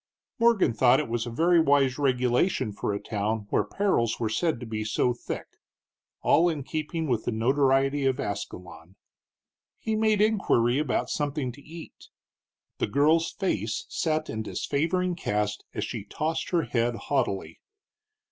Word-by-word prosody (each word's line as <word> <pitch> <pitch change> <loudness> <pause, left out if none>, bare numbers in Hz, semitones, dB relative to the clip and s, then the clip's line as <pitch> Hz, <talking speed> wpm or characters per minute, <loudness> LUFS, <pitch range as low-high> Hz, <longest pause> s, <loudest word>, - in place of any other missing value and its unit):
Morgan 230 - +4
thought 125 +3 +4
it 150 - -2
was 120 +1 -2
a - - -3
very 170 +8 +3
wise 140 -3 +3
regulation 125 - +1
for 100 - -2
a 100 - -2
town 105 0 -2
where - - +3
perils 155 - 0
were 115 -2 -1
said 160 +4 0
to 120 - -7
be 110 -1 -3
so 110 +3 +1
thick, 120 - -6 0.8
all 175 +3 +4
in 150 -4 -3
keeping 160 +3 -3
with 120 -5 -1
the - - 0
notoriety 135 +4 +2
of 135 +1 0
Ascalon. 90 -6 -6 0.8
He 220 - -2
made 215 -1 +2
inquiry 170 - +2
about 150 -4 -1
something 145 -3 -2
to 140 +4 -14
eat. 165 +3 -12 0.7
The - - +1
girl's 160 +4 +3
face 110 - -2
set 155 -1 -1
in 110 - -4
disfavoring 170 +10 -1
cast 105 - -2
as - - -2
she - - -5
tossed 160 +2 -3
her 170 -2 +1
head 120 -2 0
haughtily. 100 - -2
135 Hz, 155 wpm, -27 LUFS, 115-160 Hz, 0.8 s, Morgan